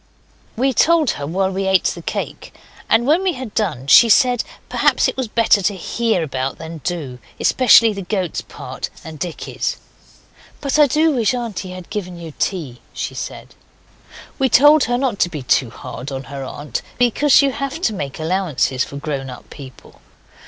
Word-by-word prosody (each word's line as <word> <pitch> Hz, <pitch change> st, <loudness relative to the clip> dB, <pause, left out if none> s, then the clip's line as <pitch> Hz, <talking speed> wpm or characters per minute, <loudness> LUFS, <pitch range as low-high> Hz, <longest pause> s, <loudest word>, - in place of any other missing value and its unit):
We 265 Hz, +3 st, +2 dB
told 325 Hz, +1 st, +3 dB
her 140 Hz, 0 st, -5 dB
while 190 Hz, +4 st, 0 dB
we 190 Hz, 0 st, -2 dB
ate 190 Hz, -1 st, +3 dB
the -, -, -2 dB
cake; -, -, -5 dB, 0.3 s
and 235 Hz, -, +4 dB
when 310 Hz, +7 st, +3 dB
we 380 Hz, -2 st, 0 dB
had 255 Hz, -6 st, -7 dB
done 160 Hz, -, -1 dB
she 230 Hz, -, +7 dB
said 245 Hz, 0 st, +4 dB, 0.2 s
perhaps -, -, +2 dB
it -, -, -3 dB
was 260 Hz, -2 st, -2 dB
better 220 Hz, -2 st, +3 dB
to 200 Hz, +2 st, 0 dB
hear 220 Hz, +1 st, -1 dB
about 135 Hz, -3 st, -3 dB
than 160 Hz, 0 st, -8 dB
do, 145 Hz, -5 st, -4 dB, 0.2 s
especially 230 Hz, -3 st, +5 dB
the 200 Hz, -, -5 dB
goat's 185 Hz, -2 st, -2 dB
part -, -, -7 dB
and 160 Hz, -2 st, -9 dB
Dicky's. 175 Hz, -2 st, -4 dB, 0.8 s
'But 280 Hz, +1 st, 0 dB
I 295 Hz, -, +7 dB
do 315 Hz, +4 st, +3 dB
wish 250 Hz, -3 st, +1 dB
auntie 215 Hz, -6 st, -4 dB
had 185 Hz, -1 st, -10 dB
given 185 Hz, -4 st, -5 dB
you 165 Hz, -2 st, -9 dB
tea,' 145 Hz, -, -3 dB
she -, -, -4 dB
said. -, -, -7 dB, 0.9 s
We 265 Hz, -1 st, +2 dB
told 290 Hz, +4 st, +6 dB
her 245 Hz, 0 st, 0 dB
not 250 Hz, -6 st, -1 dB
to 175 Hz, -, +2 dB
be 150 Hz, -6 st, -6 dB
too 125 Hz, 0 st, +2 dB
hard 130 Hz, +3 st, -8 dB
on 135 Hz, 0 st, -5 dB
her 140 Hz, 0 st, -7 dB
aunt, 145 Hz, 0 st, -5 dB, 0.2 s
because 255 Hz, +4 st, +4 dB
you 275 Hz, -, +2 dB
have 275 Hz, +4 st, -4 dB
to 220 Hz, -, +1 dB
make 140 Hz, -8 st, -5 dB
allowances 160 Hz, -6 st, 0 dB
for 140 Hz, -, -8 dB
grown 140 Hz, -2 st, -4 dB
up 125 Hz, -, -11 dB
people. 130 Hz, -3 st, -13 dB
190 Hz, 180 wpm, -19 LUFS, 150-245 Hz, 0.9 s, she